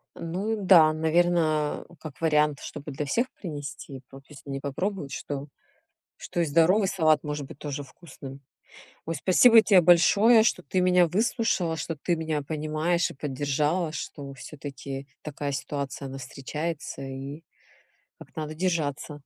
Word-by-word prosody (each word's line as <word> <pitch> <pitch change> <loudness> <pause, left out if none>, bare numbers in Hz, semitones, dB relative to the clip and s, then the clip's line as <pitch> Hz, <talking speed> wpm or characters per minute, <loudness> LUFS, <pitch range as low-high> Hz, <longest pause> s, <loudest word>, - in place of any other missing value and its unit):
Ну 190 +7 -3
да, 170 -5 +6
наверно, 160 -1 +1
как 155 -3 -10
вариант, 150 -2 +2
чтобы 145 +1 -7
для 150 +2 -4
всех 235 - 0
принести, 145 -5 -7
по 135 - -12
то 135 - -25
есть, 140 -2 -14
не 135 -1 -4
попробовать, 145 +2 -3
что 145 0 -5 0.7
что - - -5
и - - +2
здоровый 170 +7 +3
салат 155 -6 +2
может 150 -1 -4
быть 135 - -12
тоже 145 -1 -5
вкусным. 140 -2 -12 0.6
Ой, 165 - -2
спасибо 225 - +6
те 200 -4 +5
большое, 200 +7 +6
что 235 - +1
ты 185 - 0
меня 180 -1 +4
выслушала, 190 -4 0
что 160 +2 -4
ты 170 +4 -1
меня 160 -2 -2
понимаешь 155 +3 -1
и - - -10
поддержала, 145 +4 -1
что 140 -3 -7
всё-таки 140 -1 -8
такая 145 -1 -4
ситуация, 140 0 -4
она 135 - -7
встречается 140 +3 -5
и 135 +4 -7 0.8
как - - -15
надо 155 0 -4
держаться. 155 -4 -2
155 Hz, 145 wpm, -26 LUFS, 140-175 Hz, 0.8 s, да